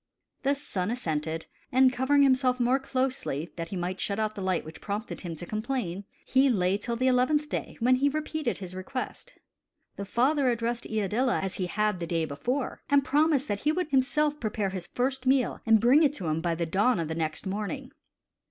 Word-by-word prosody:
The 280 +1 +2
son 205 -10 -3
assented; 160 -8 -2 0.3
and 260 0 +5
covering 280 +3 +3
himself 255 -2 +3
more 250 +2 +3
closely, 255 - -2
that 165 -1 -4
he 195 - -6
might 180 +1 -3
shut 200 - -1
out 215 -1 0
the 205 - -7
light 185 -3 0
which 160 +1 -10
prompted 210 +3 -4
him 170 -3 -5
to 175 - -5
complain, 215 -3 -3 0.2
he 270 +1 +4
lay 195 -3 +2
till 235 +2 -3
the 255 +2 -1
eleventh 260 +4 +2
day, - - -4
when 250 +2 +4
he 280 +2 +3
repeated 305 -2 -2
his 185 -2 -8
request. 185 +8 -6 0.6
The 200 - -4
father 260 +6 +2
addressed 235 0 -1
Iadilla 220 +4 0
as 190 -1 -3
he 185 - -1
had 210 0 0
the 170 - -4
day 165 -1 0
before, 245 - -3
and 285 -1 +4
promised 295 0 +2
that 205 - -1
he 300 - +2
would 355 0 -1
himself 295 +3 +2
prepare 210 -3 -1
his 185 -2 -5
first 260 +1 -2
meal 260 -1 +2
and 225 -1 +6
bring 250 +7 +5
it 290 -3 +4
to 195 -11 -6
him 155 0 0
by 170 -1 0
the 170 +1 -1
dawn 200 +7 +2
of 165 - -1
the 160 - -3
next 160 +1 -3
morning. 200 +2 -4
235 Hz, 205 wpm, -28 LUFS, 185-265 Hz, 0.6 s, and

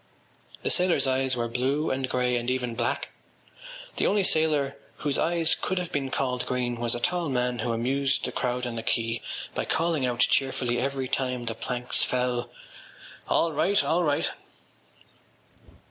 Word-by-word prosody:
The - - +1
sailors’ 180 -4 +3
eyes 130 0 +1
were 120 -1 -1
blue 135 +6 0
and 130 0 -1
grey 125 -1 +1
and 120 0 -1
even 125 -2 -1
black. 120 0 -1 0.9
The - - +2
only 205 -1 +3
sailor 150 -5 +2 0.2
whose 145 -2 -1
eyes 165 -1 +3
could 185 - -2
have 180 -2 -2
been 135 -2 -1
called 125 -2 -1
green 125 -2 -1
was 120 0 +1
a - - -3
tall 175 +4 0
man 125 -1 0
who 115 +2 -1
amused 135 +4 +1
the - - -2
crowd 125 0 -1
on 120 -1 -4
the - - -2
quay 115 0 0 0.3
by - - -2
calling 165 -4 +1
out 120 0 -1
cheerfully 130 -2 +2
every 135 0 -1
time 125 -2 -1
the 115 - -1
planks 125 +2 -2
fell: 125 -1 0 0.8
“All 165 -1 +2
right! 200 +7 +3
All 170 +2 +2
right! 145 -3 +1
130 Hz, 165 wpm, -27 LUFS, 120-145 Hz, 0.9 s, sailors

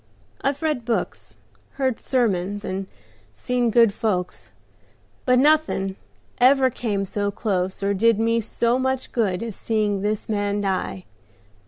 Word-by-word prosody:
I've 275 +2 -1
read 300 -6 0
books, 175 - -3 0.4
heard 260 -4 -1
sermons, 205 -5 0
and 190 +1 -3 0.5
seen 245 - 0
good 230 -2 +5
folks, 185 -5 -2 0.8
but 250 - +5
nothing 285 -9 +2 0.4
ever 260 +1 +5
came 205 -5 -2
so 205 +1 -2
close 190 -2 -2
or 200 0 +2
did 225 +2 +3
me 230 +1 +2
so 235 +3 0
much 260 0 -1
good 200 -5 0
as 225 -4 -5
seeing 210 -3 0
this 210 +1 -2
man 205 -1 -1
die. 190 -1 -2
215 Hz, 135 wpm, -23 LUFS, 195-245 Hz, 0.8 s, good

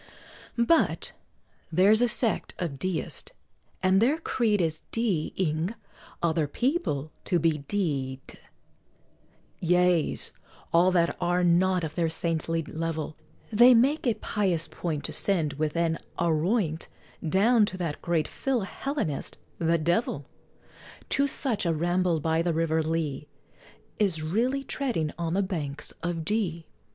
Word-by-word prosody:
But 235 +8 +2 0.6
there's 200 +7 +5
a 245 - +5
sect 230 -1 +1
of 150 -7 -4
Deists, 185 +1 -3 0.5
and 190 +1 +4
their 270 +7 +3
creed 230 -9 +1
Is 160 -3 -1
D 210 -9 0
ing 170 +3 0 0.5
other 160 -2 +2
people 200 - -1
to 180 - +2
be 160 -2 +1
d 140 -10 -1
d, - - -10 1.2
Yeas, 180 -1 +2 0.4
all 175 +2 +6
that 170 -2 +2
are 175 +1 +2
not 180 +1 +3
of 155 -2 -3
their 165 -1 0
saintly 165 0 -1
level, 160 0 -4 0.4
They 240 +3 +8
make 270 +5 +3
a 230 - +3
pious 185 -6 -1
point 155 -4 -4
To - - -2
send, 165 -7 +1
with 150 +2 -2
an 165 -1 +1 0.2
"aroint," 170 +1 +1 0.4
Down 205 +6 +4
to 185 - -5
that 165 -5 -3
great 165 -3 0
Fillhellenist, 265 - -3 0.2
the 165 0 +2
Devil. 170 +8 0 0.8
To 280 +1 +2
such, 250 -6 -2
a 170 -2 +1
ramble 175 +1 +1
by 160 +1 +1
the 170 0 0
River 160 0 +1
Lea 155 -2 -2 0.7
Is 180 -7 +1
really 240 - 0
treading 240 - -2
on 170 0 -1
the 200 - +2
"Banks 150 -6 -4
of 165 -1 -3
D 175 -5 -1
170 Hz, 135 wpm, -27 LUFS, 160-205 Hz, 1.2 s, They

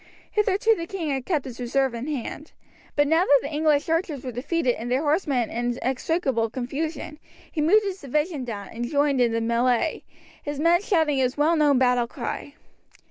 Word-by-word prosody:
Hitherto 420 +1 +3
the 335 -3 -5
king 335 -6 -3
had 265 -2 -3
kept 310 -7 0
his 255 -2 -8
reserve 260 +1 0
in 235 +4 -5
hand; 295 +2 -5 0.4
but 290 0 +3
now 325 +4 +4
that 285 -6 +5
the 285 +2 -5
English 300 -1 +2
archers 325 -4 -1
were 255 - -3
defeated 260 +2 0
and 235 +1 -6
their 260 +4 +1
horsemen 290 - +1
in 240 +1 -1
inextricable 260 -3 0
confusion, 290 +5 -4 0.3
he 310 - -2
moved 405 +8 +5
his 390 -1 -4
division 300 +2 -1
down 205 -5 -6
and 240 +1 -5
joined 285 -3 +2
in 240 -2 +3
the 230 - 0
melee, 240 +5 +1 0.4
his 290 -1 -5
men 340 +3 +4
shouting 320 -8 +1
his 255 0 0
well 310 +3 +3
known 295 -3 +4
battle 250 -2 +3
cry. 270 +3 -6
285 Hz, 190 wpm, -25 LUFS, 250-320 Hz, 0.4 s, that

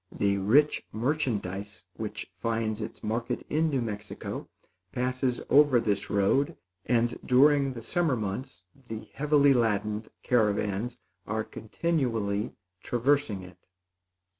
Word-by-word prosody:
The 100 -1 +1
rich 135 +10 +4
merchandise 110 - -2
which 105 -3 -5
finds 115 0 -1
its 105 - -7
market 115 +3 -2
in 160 +1 +2
New 135 -4 0
Mexico 105 -2 -5 0.4
passes 125 +1 -1
over 145 -3 +6
this 105 -3 -1
road; 135 +11 +2 0.3
and, 120 0 +1
during 135 +1 +4
the 115 -2 -8
summer 160 +3 +1
months, 105 -1 -5 0.2
the 110 -1 -6
heavily 145 -1 +4
laden 105 -2 +1 0.2
caravans 105 0 +1 0.3
are 110 +1 -1
continually 110 -7 -1 0.3
traversing 120 -5 +1
it. 90 0 -15
115 Hz, 115 wpm, -28 LUFS, 105-135 Hz, 0.4 s, over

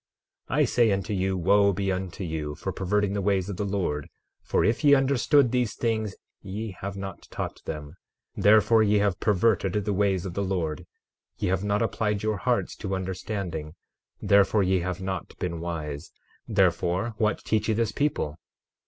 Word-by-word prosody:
12:26 - - -1
I - - +5
say 120 -3 +3
unto 100 +2 -1
you, 95 0 0
wo 100 +3 +4
be 95 +1 -1
unto 95 0 -4
you 80 -3 -3
for 95 - -4
perverting 100 +2 0
the 100 - -1
ways 95 -1 +1
of 100 - -4
the 105 - -1
Lord! 90 -8 -2 0.3
For - - +1
if 115 +7 +1
ye 145 -1 +7
understand 135 -1 +3
these 125 -5 0
things 110 -4 -1 0.3
ye 105 +3 -5
have 100 +2 -6
not 95 0 -7
taught - - -5
them; 75 -2 -6 0.4
therefore, 110 +2 +5
ye 105 -1 +3
have 100 -3 +1
perverted 100 -2 +2
the 105 0 0
ways 95 -2 +1
of 90 - -4
the 100 - -2
Lord. 90 -6 -2 0.5
12:27 - - -28
Ye - - +2
have 95 +1 0
not 105 0 +1
applied 105 -2 -1
your 110 -1 0
hearts - - 0
to 95 0 -3
understanding; 90 -4 -4 0.4
therefore, 100 +1 +4
ye 95 0 +2
have 90 +2 -3
not 95 0 -5
been 85 -2 -3
wise. 75 -4 -5 0.4
Therefore, 95 +1 +1
what 110 -1 0
teach 110 -1 +1
ye 110 - +2
this 115 -1 0
people? 110 - -1
100 Hz, 180 wpm, -26 LUFS, 90-105 Hz, 0.5 s, ye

